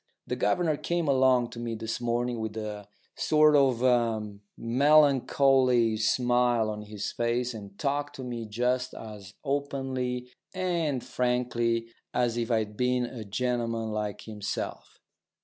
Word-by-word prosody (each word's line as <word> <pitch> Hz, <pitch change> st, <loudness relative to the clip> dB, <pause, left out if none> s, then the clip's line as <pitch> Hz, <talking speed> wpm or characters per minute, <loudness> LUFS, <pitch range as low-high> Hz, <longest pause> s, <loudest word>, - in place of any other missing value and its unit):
The -, -, -2 dB
governor 165 Hz, -4 st, +1 dB
came 170 Hz, 0 st, -1 dB
along 130 Hz, -3 st, +3 dB
to 115 Hz, -, -8 dB
me 120 Hz, -1 st, -3 dB
this 115 Hz, +2 st, -4 dB
morning 120 Hz, 0 st, -1 dB
with 110 Hz, 0 st, -4 dB
a 105 Hz, -2 st, -5 dB, 0.3 s
sort 155 Hz, -1 st, +4 dB
of 120 Hz, -5 st, +2 dB, 0.3 s
melancholy 130 Hz, -2 st, +4 dB
smile 120 Hz, 0 st, +2 dB
on 105 Hz, 0 st, -6 dB
his 105 Hz, -1 st, -5 dB
face, 120 Hz, +1 st, -1 dB
and 100 Hz, -3 st, -10 dB
talked 145 Hz, +1 st, -2 dB
to 130 Hz, -, -7 dB
me 120 Hz, -3 st, -5 dB
just 125 Hz, +4 st, -1 dB
as 105 Hz, -2 st, -10 dB
openly 130 Hz, -3 st, -2 dB, 0.2 s
and 170 Hz, -8 st, -1 dB
frankly 120 Hz, -2 st, 0 dB, 0.3 s
as 120 Hz, -2 st, +1 dB
if 120 Hz, 0 st, -2 dB
I'd 110 Hz, -3 st, 0 dB
been 125 Hz, +1 st, +1 dB
a 120 Hz, -2 st, -7 dB
gentleman 115 Hz, +1 st, -2 dB
like 105 Hz, -1 st, -3 dB
himself. 105 Hz, -2 st, -5 dB
120 Hz, 130 wpm, -28 LUFS, 110-130 Hz, 0.3 s, sort